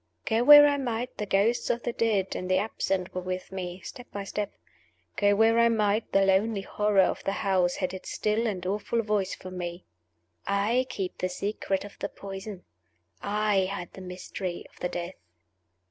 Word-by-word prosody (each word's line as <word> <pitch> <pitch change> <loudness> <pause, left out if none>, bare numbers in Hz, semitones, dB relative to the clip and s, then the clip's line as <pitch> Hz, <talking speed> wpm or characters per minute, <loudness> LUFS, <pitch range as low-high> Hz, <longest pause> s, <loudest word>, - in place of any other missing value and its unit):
Go 225 +1 +2
where 290 +2 +10
I 285 -1 +3
might, 245 -1 -3
the 210 - -2
ghosts 205 +5 +2
of 235 - 0
the 240 - -2
dead 210 -5 0
and 185 - -4
the 185 - +4
absent 190 -2 -1
were 185 - -3
with 185 +1 -5
me, 180 -1 -5
step 245 - -9
by 200 - -4
step. 205 +1 -3 0.6
Go 205 0 +3
where 225 +2 +4
I 235 0 +5
might, 215 -1 +1
the 195 0 +4
lonely 195 +2 +2
horror 205 0 +2
of - - -1
the 195 - -1
house 185 -2 +2
had 185 -1 -2
its 190 - -7
still 215 +2 0
and 185 -4 -3
awful 210 +4 -1
voice 205 -3 0
for 185 - -10
Me: 175 -1 -5 0.6
"I 215 +6 +1
keep 195 -7 -4
the 185 - 0
secret 195 +1 -2
of 205 - -13
the 200 - -3
Poison! 195 -1 -8 0.6
I 205 -2 +1
hide 185 -2 -5
the 190 - -10
mystery 180 0 -6
of - - -21
the 180 - -2
death!" 175 +1 -4
200 Hz, 190 wpm, -27 LUFS, 185-220 Hz, 0.6 s, where